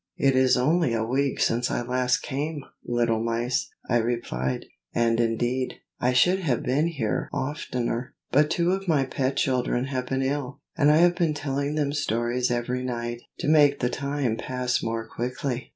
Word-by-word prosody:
"It 135 -1 +3
is 130 -1 +4
only 150 0 +2
a 110 - 0
week 135 +3 0
since 120 +1 +1
I - - -1
last 125 +1 +1
came, 145 +2 -3 0.2
little 115 -2 +1
mice!" 115 +2 -1 0.2
I 120 - +3
replied; 110 - -2 0.3
"and 115 0 +2
indeed, 120 +3 0 0.2
I 125 - +2
should 180 +10 +4
have 140 - 0
been 145 +6 +2
here 140 -11 -2
oftener, 130 -4 -3 0.2
but 150 +3 +4
two 170 +2 +1
of 195 0 -2
my 145 -5 +3
pet 135 +1 -1
children 125 -1 +1
have 130 -2 -3
been 135 0 0
ill, 135 -1 -2 0.2
and 150 -3 +4
I 150 - +6
have 175 +1 +5
been 165 -4 +1
telling 140 0 -2
them 145 -2 0
stories 120 -2 0
every 125 +1 -1
night, 120 -1 -3 0.2
to - - -2
make 145 -2 +5
the 125 0 0
time 140 -4 -1
pass 125 -1 -1
more 115 0 -3
quickly." 125 +2 -3
130 Hz, 175 wpm, -26 LUFS, 120-145 Hz, 0.3 s, I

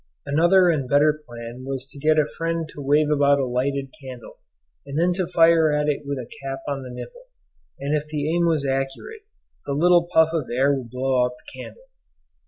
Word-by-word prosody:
Another 175 +5 +4
and 140 -6 -2
better 150 +2 +4
plan 120 +1 -9
was 135 0 -5
to 140 - -9
get 155 +2 +2
a 155 - +4
friend 165 -1 -2
to 145 - -9
wave 145 +2 +2
about 140 -1 +4
a 135 - 0
lighted 135 +2 -2
candle, 130 -3 -10 0.4
and 140 +1 -6
then 175 +2 +2
to 180 -2 -3
fire 165 -2 +5
at 150 0 0
it 145 -1 -2
with 140 -1 -2
a 125 -3 -6 0.2
cap 135 0 -4
on 140 -1 -3
the 130 - -8
nipple, - - -10 0.5
and 140 +2 -2
if 150 0 -2
the 150 -1 -3
aim 170 0 +2
was 155 -4 +1
accurate 135 - -4 0.4
the 140 - -1
little 175 +3 +3
puff 160 -2 +5
of 155 -6 -2
air 135 +4 +2
would 130 -4 -4
blow 130 +1 +1
out 125 0 -1
the 130 +1 -12
candle. - - -11
145 Hz, 205 wpm, -23 LUFS, 135-160 Hz, 0.5 s, fire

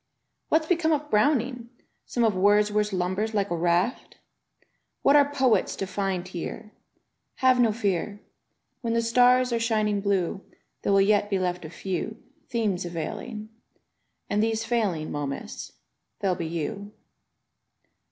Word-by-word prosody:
"What's 315 0 +3
become 330 -1 +1
of 295 0 -2
Browning? 240 +1 +1 0.4
Some 240 - 0
of 220 -2 +3
Wordsworth 210 +2 +3
lumbers 190 +4 -1
like 200 -2 0
a - - +1
raft? 175 +8 0 0.9
"Yi^at 280 - +6
are 285 -1 +5
poets 260 -5 +2
to 195 - -3
find 190 -1 -2
here?*' 200 +4 -6 0.3
— - - -52
Have 255 -1 +5
no 235 -3 +4
fear: 205 -2 -2 0.6
Y^en 230 -1 0
the 230 - +2
stars 250 +2 +4
are 235 - +1
shining 215 -3 +1
blue 195 -2 0 0.4
There - - 0
will 195 0 +5
yet 205 +1 +3
be 195 - +1
left 180 -2 -2
a - - -7
few 190 +5 -4 0.3
Themes 215 -7 0
availing 210 +6 -5 0.4
— - - -51
And 205 - +1
tiiese 225 0 0
failings 205 -10 -1
Momus, 145 -2 -5 0.5
there'll 190 -2 +1
be 170 -2 -4
you. 195 +6 -4
210 Hz, 145 wpm, -26 LUFS, 185-230 Hz, 0.9 s, Yi^at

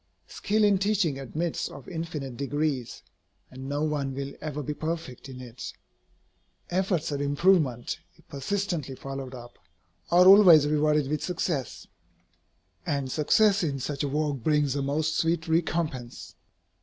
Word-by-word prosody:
Skill 215 - 0
in 205 -2 +4
teaching 195 -8 +1
admits 155 +5 -3
of 140 - -11
infinite 160 -6 -5
degrees, 140 -2 -2 0.5
and 130 +1 -8
no 145 +1 -1
one 145 -3 -1
will 140 0 -5
ever 150 -1 -4
be 150 - -3
perfect 155 -5 -5
in 130 -1 -9
it. 125 0 -8 1.0
Efforts 180 -3 0
at 140 -1 -2
improvement, 145 -4 +2 0.2
if - - -25
persistently 155 -1 -3
followed 135 -1 -7
up, 120 -1 -12 0.5
are 180 +1 +6
always 185 -6 +9
rewarded 150 -1 +2
with 150 +2 -2
success, 165 -6 -3 1.0
and 140 -3 -2
success 200 +8 +3
in 145 -5 -1
such 140 +2 -3
a - - 0
work 150 0 -1
brings 145 +1 +1
a 140 - -1
most 155 +3 0
sweet 165 0 0
recompense. 160 -6 -2
150 Hz, 140 wpm, -27 LUFS, 135-165 Hz, 1.0 s, always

